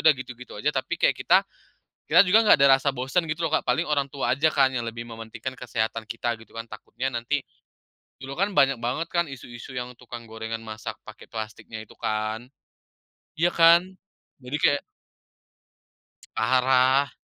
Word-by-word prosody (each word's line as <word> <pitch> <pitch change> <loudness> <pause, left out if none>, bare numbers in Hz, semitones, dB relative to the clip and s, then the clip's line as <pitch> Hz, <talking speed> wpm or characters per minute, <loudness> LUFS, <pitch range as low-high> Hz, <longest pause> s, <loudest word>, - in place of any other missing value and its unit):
udah 155 - +8
gitu-gitu 125 -1 -9
aja, - - 0
tapi - - -2
kayak - - +3
kita - - +5 0.7
kita 195 - +7
juga 190 +5 +6
nggak 215 - +7
ada 140 0 +6
rasa 140 - 0
bosan 135 +6 0
gitu 160 +2 -2
loh 155 - -4
Kak, - - +2
paling 125 - +2
orang 140 -2 0
tua 130 -3 -1
aja 150 +4 +3
kan, 135 -3 +3
yang 120 - 0
lebih 115 0 -5
mementingkan 115 +2 -7
kesehatan 115 -2 -3
kita 120 +1 -1
gitu - - -19
kan, 115 - -4
takutnya 115 +3 -6
nanti 120 +5 -1 0.9
dulu 135 +2 -7
kan 200 +1 +1
banyak 135 -2 +4
banget 125 +8 -2
kan 170 0 +1
isu-isu 125 -2 -10
yang 125 0 -4
tukang 120 -1 -9
gorengan 110 0 -5
masak 110 -1 -6
pakai - - -12
plastiknya 110 0 -7
itu 110 - -16
kan. 110 +2 -2 0.9
Iya 170 +2 +3
kan? 170 0 +7 0.6
Jadi, 130 +3 -4
kayak 145 - +4 1.6
Parah. 130 +3 +3
125 Hz, 165 wpm, -25 LUFS, 115-140 Hz, 1.6 s, udah